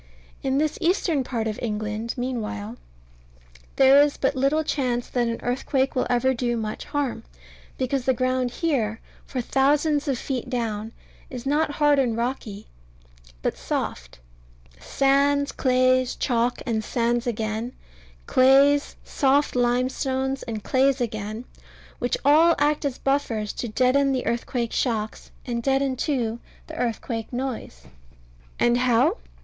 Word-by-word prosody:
In 270 0 0
this 305 +1 0
eastern 335 -5 +1
part 235 -3 -3
of 215 -1 -3
England, 215 0 -3
meanwhile, 225 -3 -4 1.0
there 270 +1 +7
is 290 -1 +2
but 270 +1 0
little 275 +4 +2
chance 250 -5 -1
that 245 -2 0
an 230 0 -2
earthquake 265 +2 0
will 255 - +1
ever 250 +2 +2
do 240 -1 -1
much 215 -1 -4
harm, 290 -4 -2 0.6
because 260 0 -1
the 260 - +3
ground 255 0 0
here, 240 -6 -1 0.3
for 255 - -3
thousands 290 +4 +2
of 270 -3 0
feet 255 0 -4
down, 225 -3 -3 0.4
is 250 -1 -7
not 295 +2 +1
hard 295 -1 +3
and 240 -4 +1
rocky, 235 -4 -4 0.8
but - - 0
soft - - -4 0.6
sands, 280 +1 +2
clays, 255 -1 +2
chalk, 240 -1 0
and 225 -3 -1
sands 240 +2 0
again; 220 +1 -2 0.5
clays, 275 +3 +4
soft 280 +1 +1
limestones, 260 +2 0
and 220 -3 -5
clays 270 +1 +2
again 215 0 -4 0.5
which 245 - 0
all 320 +4 +6
act 295 +1 +1
as 275 -3 -2
buffers 240 -7 -1
to 240 - -4
deaden 260 +4 +2
the 255 - -2
earthquake 235 0 -2
shocks, 220 -4 -2 0.2
and 235 -2 -2
deaden 270 +1 +1
too 240 -4 -1 0.3
the - - -9
earthquake 230 -1 -3
noise. 245 - -5 0.8
And 240 0 +3
how? 255 - +3
255 Hz, 135 wpm, -24 LUFS, 235-275 Hz, 1.0 s, there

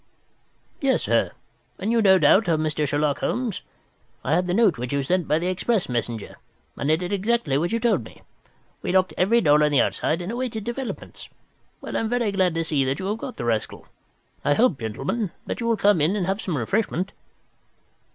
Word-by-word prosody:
"Yes, 270 -2 +2
sir; - - +2 0.5
and 200 +4 -2
you, 230 -1 +3
no 190 -2 +6
doubt, 190 +1 +4
are 160 - +3
Mr. 155 -1 -1
Sherlock 145 +1 0
Holmes? 240 -6 -2 0.6
I 145 - 0
had 180 +2 +2
the 175 - 0
note 210 - +3
which 125 0 -4
you 140 -1 0
sent 175 +4 0
by 150 - +2
the 170 - -2
express 185 +3 0
messenger, 120 -3 -4 0.4
and 140 - -1
I - - +5
did 180 +4 -4
exactly 200 -7 0
what 165 +5 0
you 230 - 0
told 220 - +1
me. - - -15 0.6
We - - -2
locked 185 0 +3
every 230 +6 +3
door 150 -3 +5
on 150 - +2
the 145 - +3
inside 165 +5 +1
and 180 - -4
awaited 240 -3 -3
developments. 240 +3 -6 0.5
Well, - - -6
I'm 225 - 0
very 240 -3 0
glad 185 -4 +1
to 165 - 0
see 150 -4 +1
that 135 +2 -1
you 190 - -5
have 215 +2 -2
got 250 - -7
the 120 - -4
rascal. 115 -2 -2 0.6
I 145 - +3
hope, 230 - +3
gentlemen, 135 - -2 0.2
that - - -4
you 230 - -2
will 230 -1 +2
come 200 -6 +3
in 165 +7 +2
and 195 -4 -1
have 195 +3 -1
some 175 -6 -2
refreshment." 190 - -1
180 Hz, 210 wpm, -24 LUFS, 150-220 Hz, 0.6 s, no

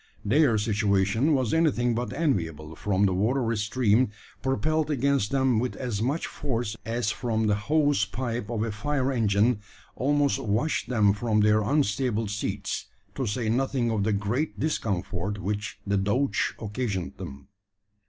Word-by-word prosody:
Their 130 +1 +4
situation 105 +5 +2
was 130 -5 0
anything 135 -7 +2
but 120 +2 -2
enviable; 80 - -1
for 100 +3 +1
the 95 - +2
watery 115 +4 +1
stream, 110 +2 +2 0.3
propelled 155 +4 0
against 140 -6 +1
them 130 -4 +2
with 125 +2 -2
as 120 -6 -3
much 140 +8 0
force 120 -6 -3
as 115 -2 0
from 110 -2 -1
the 105 - +3
hose 145 +3 +2
pipe 115 +1 -4
of 115 -2 -1
a 115 - -2
fire 135 +4 -1
engine, 110 -1 +2 0.4
almost 145 +1 +2
washed 115 +6 -1
them 105 -5 +4
from 105 0 +1
their 105 +1 +4
unstable 115 -3 0
seats; 100 -1 -3 0.3
to 130 - -2
say 110 +2 -1
nothing 125 0 +1
of 105 -3 0
the 110 - +1
great 105 +9 -1
discomfort 100 - -2
which 105 +1 -3
the 100 0 +1
douche 120 +8 +1
occasioned 105 - -3
them. 70 +7 -9
115 Hz, 150 wpm, -27 LUFS, 105-130 Hz, 0.4 s, Their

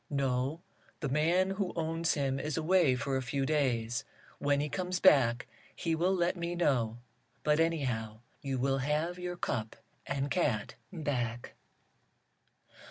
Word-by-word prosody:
"No, 135 +2 0 0.4
the 145 - -2
man 170 +7 +2
who 195 -2 -2
owns 165 0 0
him 135 -2 0
is 150 +1 -3
away 165 -4 +4
for 125 +2 -2
a - - -1
few 135 +2 -1
days. 130 -4 0 0.4
When 145 0 +2
he 145 - 0
comes 180 +3 -2
back 125 -10 +5 0.3
he 165 - -1
will 175 +4 +2
let 175 0 +1
me 170 0 -3
know. 120 -9 +1 0.5
But, 150 0 +3
anyhow, 125 -10 0 0.2
you 135 -2 -2
will 135 +1 +1
have 155 +6 -1
your 180 0 -4
cup 110 -9 -2 0.3
and 140 0 -2
cat 135 - 0 0.2
back." 125 -9 -3
145 Hz, 145 wpm, -31 LUFS, 130-170 Hz, 0.5 s, back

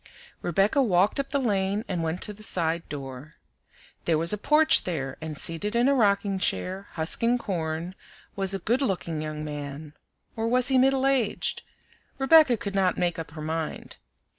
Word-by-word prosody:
Rebecca 195 - +2
walked 200 +1 +2
up 275 - -2
the 280 - 0
lane 205 -4 -1
and 180 -3 -2
went 165 +2 -1
to 210 - -3
the 210 - -15
side 170 -5 -1
door. 135 0 -8 0.7
There 165 -2 +2
was 165 +4 +7
a - - -1
porch 310 +6 +4
there, 135 -7 -4
and 155 -2 -6
seated 185 +9 -2
in 240 +2 +3
a 280 - +4
rocking 200 -5 +1
chair, 190 +1 -2
husking 230 +9 +1
corn, 170 -5 -4 0.4
was 195 -1 0
a - - -1
good 235 +8 0
looking 175 - -2
young 155 0 -5
man, 145 0 -7 0.4
or 225 0 -2
was 250 +2 +3
he 265 -1 +4
middle 265 0 +3
aged? 265 -6 0 0.6
Rebecca 270 -2 +5
could 200 -1 -5
not 190 -2 +1
make 175 -2 -1
up 165 - -6
her 155 - -6
mind. 160 0 -5
190 Hz, 175 wpm, -26 LUFS, 160-235 Hz, 0.7 s, was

